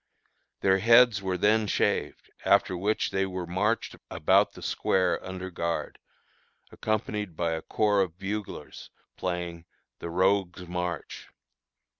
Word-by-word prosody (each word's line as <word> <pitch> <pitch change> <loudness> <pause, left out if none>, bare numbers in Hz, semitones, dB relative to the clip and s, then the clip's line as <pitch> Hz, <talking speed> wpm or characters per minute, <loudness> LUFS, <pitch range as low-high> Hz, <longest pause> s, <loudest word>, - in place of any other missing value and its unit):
Their 95 0 +4
heads 115 0 +6
were 95 -1 -1
then 110 +3 +3
shaved, - - -1
after 90 - +3
which 100 +5 0
they 95 0 0
were 90 -1 -4
marched 100 +6 -1
about - - +3
the - - -11
square 90 -2 +1
under 95 0 -6
guard, 85 -1 -3 0.7
accompanied 105 -4 -2
by 85 0 0
a 80 0 -2
corps 105 +1 +2
of 90 -3 -2
buglers 100 +2 -6 0.3
playing 90 -2 -4 0.3
"the 85 - -5
rogue's 95 0 +1
march." 90 0 -4
95 Hz, 125 wpm, -28 LUFS, 90-105 Hz, 0.7 s, heads